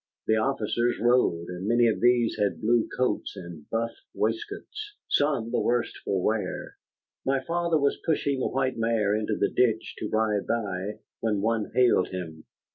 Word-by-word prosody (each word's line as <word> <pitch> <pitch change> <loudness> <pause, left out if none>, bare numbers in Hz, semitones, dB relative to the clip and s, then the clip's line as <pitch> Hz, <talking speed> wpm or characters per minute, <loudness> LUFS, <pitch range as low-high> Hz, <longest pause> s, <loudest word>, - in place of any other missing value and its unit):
The 110 - +3
officers 120 0 0
rode, 110 -8 +2
and 90 +2 -5
many 120 +1 +4
of 110 - +1
these 120 -1 +4
had 100 -1 +1
blue 115 +1 +2
coats 125 0 0
and 85 -4 -10
buff 115 +1 -1 0.2
waistcoats, 415 - -3
some 140 -6 +1
the - - +1
worse 120 0 0
for 95 -2 -1
wear. 105 -4 -2 0.5
My 135 0 +1
father 170 +2 +1
was 140 -1 +1
pushing 145 -4 0
the - - +1
white 130 -1 0
mare 115 -3 +2
into 110 0 -1
the 100 - +1
ditch 115 -3 +2
to 105 - -3
ride 110 -2 +1
by, 105 -3 -2 0.2
when 105 -3 0
one 110 0 0
hailed 125 -7 +4
him. 80 -4 -7
115 Hz, 165 wpm, -27 LUFS, 105-125 Hz, 0.5 s, many